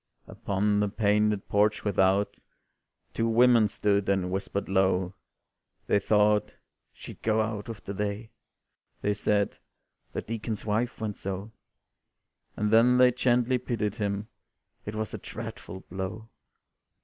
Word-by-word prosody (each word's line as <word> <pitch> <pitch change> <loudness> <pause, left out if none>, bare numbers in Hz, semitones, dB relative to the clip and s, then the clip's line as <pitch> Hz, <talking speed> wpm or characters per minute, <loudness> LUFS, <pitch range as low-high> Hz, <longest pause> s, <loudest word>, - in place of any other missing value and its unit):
Upon 105 +1 0
the 105 0 +1
painted 105 -1 +1
porch 105 +1 +2
without 100 0 +2 0.7
Two 115 - 0
women 115 -1 +5
stood, 100 -1 0
and 95 -2 +1
whispered 100 +1 -3
low, 95 -1 +1 0.7
They 100 - +3
thought 105 +1 +2 0.4
"she'd - - -12
go 110 0 +1
out 110 -1 -2
with 115 - -8
the 100 - -4
day," 105 +2 -3 0.7
They 105 - +2
said, 100 0 0 0.5
"the - - -3
Deacon's 110 -1 -4
wife 115 +3 -1
went 110 -2 -3
so." 100 +2 -5 1.1
And 105 0 0
then 120 +3 +5
they 125 0 +6
gently 125 0 +2
pitied 115 -5 -2
him 100 0 -2 0.6
"It 105 - -4
was 110 -1 -3
a - - -5
dreadful 110 -4 -8
blow." 95 +5 -6
105 Hz, 130 wpm, -28 LUFS, 100-110 Hz, 1.1 s, they